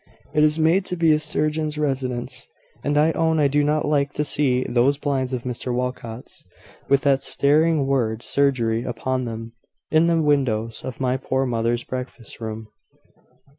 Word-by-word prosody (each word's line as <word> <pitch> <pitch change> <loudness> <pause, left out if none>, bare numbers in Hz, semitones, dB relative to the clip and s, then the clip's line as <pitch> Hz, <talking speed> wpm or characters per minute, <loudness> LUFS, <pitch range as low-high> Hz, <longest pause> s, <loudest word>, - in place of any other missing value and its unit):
It 150 - +3
is 155 0 +3
made 165 +4 +3
to 180 - -3
be 165 -2 +4
a 150 - +2
surgeon's 155 0 -1
residence: 130 -3 -2 0.4
and 145 0 0
I 155 +2 +4
own 160 -1 +1
I 145 - +4
do 145 +1 +2
not 150 +1 +1
like 145 -1 +1
to 150 - -1
see 130 -4 +2
those 130 +4 +2
blinds 135 -3 -1
of 125 -2 -3
Mr 125 0 -4
Walcot's, 125 -1 -5 0.5
with 140 0 +4
that 135 -2 +2
staring 155 +1 +3
word 120 -5 0
`Surgery,' 120 -6 +1
upon 130 +1 -2
them, 115 0 -6 0.4
in 160 +2 +4
the 165 -1 +2
windows 130 -7 0
of 130 - -6
my 130 0 +1
poor 130 0 -1
mother's 120 0 -1
breakfast 125 -2 -7
room." 110 -1 -6
135 Hz, 170 wpm, -22 LUFS, 125-150 Hz, 0.5 s, be